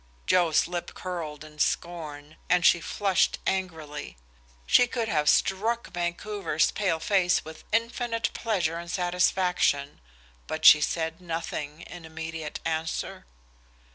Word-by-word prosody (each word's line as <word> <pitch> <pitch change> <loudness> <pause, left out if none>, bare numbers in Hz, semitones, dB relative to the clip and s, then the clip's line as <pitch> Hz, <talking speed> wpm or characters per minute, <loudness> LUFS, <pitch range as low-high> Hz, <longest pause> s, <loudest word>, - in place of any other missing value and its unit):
Joe's 170 -4 +3
lip 175 0 -5
curled 160 -5 -5
in 150 0 -14
scorn, 155 -3 -2
and 180 0 +3
she 175 - +6
flushed 195 -1 +1
angrily. 160 - -3 0.5
She 245 - +5
could 235 -2 -2
have 150 -7 +2
struck 225 +5 +1
Vancouver's 175 -1 -1
pale 190 -6 0
face 190 -3 +2
with 160 0 -10
infinite 230 0 0
pleasure 175 -8 -1
and 170 0 -8
satisfaction, 180 - +1 0.5
but 155 0 -4
she 150 - +10
said 160 +2 -2
nothing 165 -3 -5
in 175 -1 -10
immediate 160 -1 -6
answer. 160 - -3
170 Hz, 120 wpm, -27 LUFS, 160-190 Hz, 0.5 s, she